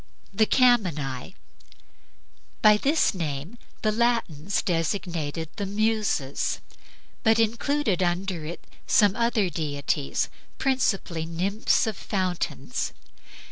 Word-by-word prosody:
THE 215 +2 +3
CAMENAE 175 - +2 1.3
By 210 0 +7
this 285 +5 +2
name 165 +4 -4 0.2
the 215 - +3
Latins 215 -7 0
designated 165 -3 -2
the 200 -2 -2
Muses, 210 -9 0 0.6
but 225 -1 +4
included 230 -1 +1
under 175 -1 -1
it 165 +3 -7
also - - -26
some 205 -2 +4
other 230 -6 +1
deities, 145 - -1 0.3
principally 195 -11 0
nymphs 190 +9 +1
of 220 -2 -2
fountains. 185 -4 -2
195 Hz, 100 wpm, -26 LUFS, 165-220 Hz, 1.3 s, By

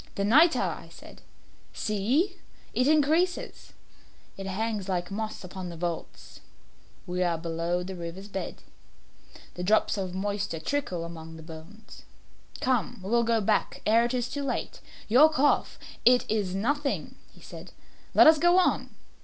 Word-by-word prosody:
"The 200 - -1
nitre!" 310 +10 +5
I - - -3
said; - - -14 0.5
"see, 250 - 0 0.4
it 255 - +2
increases. 315 +4 +1 0.6
It 195 0 -7
hangs 205 0 -3
like 175 0 -2
moss 215 +1 -4
upon 180 0 -7
the 170 - -8
vaults. 170 0 -6 0.7
We 180 0 -3
are 175 -2 +1
below 170 +2 -2
the 190 +1 -6
river's 175 +3 -7
bed. 195 -2 -6 0.9
The 180 - -7
drops 210 +1 +2
of 185 -2 -4
moisture 200 -3 -2
trickle 180 - -2
among 160 -1 -9
the 160 - -11
bones. 165 +7 -12 0.6
Come, 255 -8 0
we 195 - -5
will 235 0 +4
go 230 -1 +2
back 195 - 0
ere 225 +2 +4
it 240 +2 -1
is 245 -1 -1
too 285 - -4
late. 280 - -4 0.3
Your 265 +8 +7
cough 290 -2 +1
" - - -19
"It 245 - -3
is 205 -4 -1
nothing," 280 +8 -1 0.2
he - - -19
said; - - -11 0.4
"let - - +8
us 315 -1 +7
go 345 +3 +4
on. 370 - +2
205 Hz, 155 wpm, -27 LUFS, 180-260 Hz, 0.9 s, let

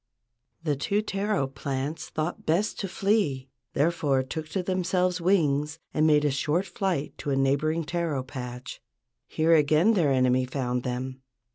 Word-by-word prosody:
The 150 -3 +1
two 200 +9 0
taro 200 -5 0
plants 135 +2 -4
thought 155 +3 -3
best 180 +7 +1
to 195 - -2
flee, 175 -10 0 0.2
therefore 145 -3 +2
took 155 +4 -6
to 190 +2 -2
themselves 180 0 0
wings 155 -4 +2 0.2
and 155 0 +3
made 150 -1 +4
a 145 - +3
short 150 +7 0
flight 190 -10 -2
to - - -4
a 140 - +2
neighboring 145 +5 +1
taro 165 -4 -2
patch. 125 -2 -7 0.5
Here 160 +1 +2
again 155 +7 +4
their 165 -9 +3
enemy 130 -1 +3
found 125 -1 -2
them. 130 +1 -4
150 Hz, 150 wpm, -27 LUFS, 135-175 Hz, 0.5 s, made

